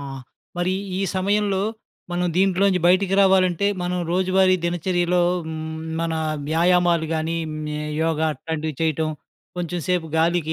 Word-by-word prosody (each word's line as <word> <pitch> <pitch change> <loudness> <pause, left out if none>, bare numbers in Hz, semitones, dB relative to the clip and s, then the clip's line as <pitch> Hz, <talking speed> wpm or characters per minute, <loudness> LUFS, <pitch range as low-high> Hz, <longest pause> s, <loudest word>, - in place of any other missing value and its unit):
ఆ! - - -7 0.6
మరి 180 +1 +1 0.3
ఈ - - -1 0.2
సమయంలో, 200 0 +1 0.5
మనం 180 0 0
దీంట్లో 190 0 +2
నుంచి 180 -2 +1
బయటికి 185 +2 +3
రావాలంటే, 190 -1 +3 0.2
మనం 180 0 -1
రోజువారీ 185 0 +3
దినచర్యలో 175 +1 +1 0.2
హ్మ్, 160 0 -5 0.2
మన 165 -1 -1 0.4
వ్యాయామాలు 170 0 +3
గానీ, 160 +1 -1
హ్మ్, 155 0 -5 0.3
యోగా 160 -1 +1
అట్లాంటివి 155 +2 -4
చేయటం. 160 0 0 0.5
కొంచెం 175 0 -3
సేపు 180 -3 +1
గాలికి, 165 -1 +1
175 Hz, 130 wpm, -22 LUFS, 160-185 Hz, 0.6 s, బయటికి